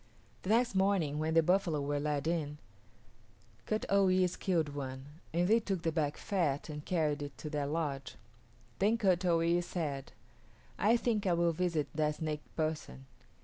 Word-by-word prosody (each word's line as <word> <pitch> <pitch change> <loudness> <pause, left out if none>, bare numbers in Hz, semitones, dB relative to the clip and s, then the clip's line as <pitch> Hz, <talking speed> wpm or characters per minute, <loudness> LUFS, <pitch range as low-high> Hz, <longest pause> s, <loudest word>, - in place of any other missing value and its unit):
The 190 - -6
next 235 +2 +3
morning 190 -7 +2
when 160 +1 0
the 165 - +6
buffalo 175 -3 +2
were 145 +1 -1
led 145 -1 -1
in, 155 -3 -1 1.1
Kut 215 0 -1
o 200 -1 +4
yis´ 185 -1 +2
killed 165 -5 +1
one, 130 -2 -5 0.3
and 175 +2 +1
they 225 +3 +5
took 195 -6 -3
the 165 - +1
back 150 -3 -1
fat 165 -8 -1
and 150 -1 -6
carried 155 -4 0
it 145 -1 -6
to 150 - -6
their 145 -2 -1
lodge. 145 -3 -3 0.6
Then 215 +4 +3
Kut 190 -5 +2
o 170 -2 +4
yis´ 170 +1 +2
said, 150 -7 -3 0.7
"I 225 +3 +4
think 220 -4 0
I 180 - +3
will 170 0 +3
visit 165 -3 0
that 150 -1 +1
snake 150 -1 -3
person." 155 -4 -3
165 Hz, 175 wpm, -33 LUFS, 150-185 Hz, 1.1 s, the